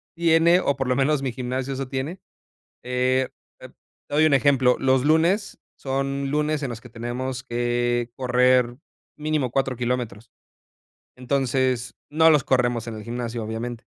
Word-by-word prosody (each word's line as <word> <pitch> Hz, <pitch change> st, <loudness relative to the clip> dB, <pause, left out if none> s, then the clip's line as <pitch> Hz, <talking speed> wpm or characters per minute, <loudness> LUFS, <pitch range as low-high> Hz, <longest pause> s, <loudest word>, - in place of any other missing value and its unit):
tiene, 170 Hz, +1 st, +4 dB
o 140 Hz, -, +1 dB
por 135 Hz, -1 st, -2 dB
lo 125 Hz, -, +1 dB
menos 140 Hz, +2 st, +2 dB
mi 135 Hz, -2 st, -2 dB
gimnasio 130 Hz, +2 st, -3 dB
eso 135 Hz, 0 st, -4 dB
tiene, 135 Hz, +7 st, -4 dB, 0.6 s
eh, 125 Hz, +1 st, +1 dB, 0.3 s
te -, -, -11 dB
te -, -, -27 dB, 0.4 s
doy 155 Hz, +1 st, +5 dB
un 155 Hz, -, +3 dB
ejemplo, 135 Hz, -2 st, +4 dB
los 130 Hz, -1 st, +2 dB
lunes, 170 Hz, +7 st, +2 dB, 0.2 s
son 135 Hz, 0 st, -2 dB
lunes 150 Hz, 0 st, 0 dB
en 135 Hz, -, -2 dB
los 115 Hz, -2 st, -6 dB
que 125 Hz, -, -12 dB
tenemos 125 Hz, +2 st, -4 dB
que 120 Hz, -1 st, -1 dB
correr 125 Hz, -1 st, +2 dB, 0.4 s
mínimo 150 Hz, -4 st, -1 dB
4 135 Hz, 0 st, 0 dB
kilómetros, 120 Hz, -3 st, -3 dB, 0.9 s
entonces, 130 Hz, -1 st, 0 dB
no 160 Hz, +2 st, +5 dB
los 150 Hz, -5 st, +4 dB
corremos 120 Hz, -2 st, +1 dB
en 115 Hz, -, -5 dB
el 110 Hz, -, -8 dB
gimnasio, 120 Hz, -1 st, -4 dB
obviamente, 115 Hz, +2 st, -5 dB
130 Hz, 155 wpm, -24 LUFS, 120-140 Hz, 0.9 s, doy